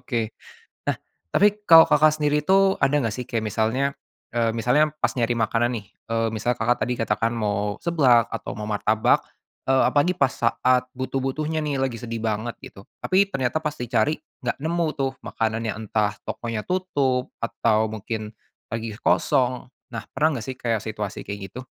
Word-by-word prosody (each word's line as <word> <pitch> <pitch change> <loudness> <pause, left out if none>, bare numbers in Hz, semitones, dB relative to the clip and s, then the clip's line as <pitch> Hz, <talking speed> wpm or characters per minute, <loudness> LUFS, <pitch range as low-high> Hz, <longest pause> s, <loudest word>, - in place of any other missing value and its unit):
Oke. 115 -3 -2 0.6
Nah, - - -2 0.3
tapi 210 +1 +3
kalau 165 -4 +9
Kakak 155 +1 +4
sendiri 150 0 +1
itu, 195 +3 +4
ada 135 +2 +3
nggak 115 -5 -1
sih? 125 - -4
Kayak 115 -2 -3
misalnya, 115 +5 +1 0.5
eee, 115 -1 +2
misalnya 125 +7 +2
pas - - +1
nyari 120 -1 +1
makanan 115 +2 +1
nih, 100 - -13 0.2
eee, 115 0 +1
misal 120 +3 -1
Kakak 120 +2 +1
tadi 125 0 -1
katakan 115 +1 0
mau 105 -3 -1
seblak, 130 -9 +4
atau - - -5
mau 105 - -4
martabak, 110 +1 +2 0.5
eee, 135 - +5
apalagi 175 +5 +2
pas 140 -2 +3
saat 125 +2 +1
butuh-butuhnya 135 +4 -2
nih, 145 -2 -1
lagi 125 -3 -2
sedih 115 -1 -4
banget, 110 +1 -2
gitu. 95 - -12 0.2
Tapi 195 +2 +2
ternyata 135 +1 -1
pas 150 -1 -2
di 125 - -3
cari, 125 +6 +1 0.2
nggak 120 - -2
nemu 165 +3 0
tuh, 135 -1 0
makanannya, 115 0 -2
entah 105 -1 -1
tokonya 115 -3 -4
tutup 140 -9 0
atau 110 -1 +1
mungkin 110 0 -5 0.3
lagi 115 -1 -5
kosong. 125 -1 +1 0.2
Nah, - - -3
pernah 155 +2 +1
enggak 115 - -7
sih, 130 - -6
kayak, 115 -3 0
situasi 105 -2 -5
kayak 100 -1 -7
gitu? 125 0 -7
120 Hz, 170 wpm, -24 LUFS, 110-145 Hz, 0.6 s, kalau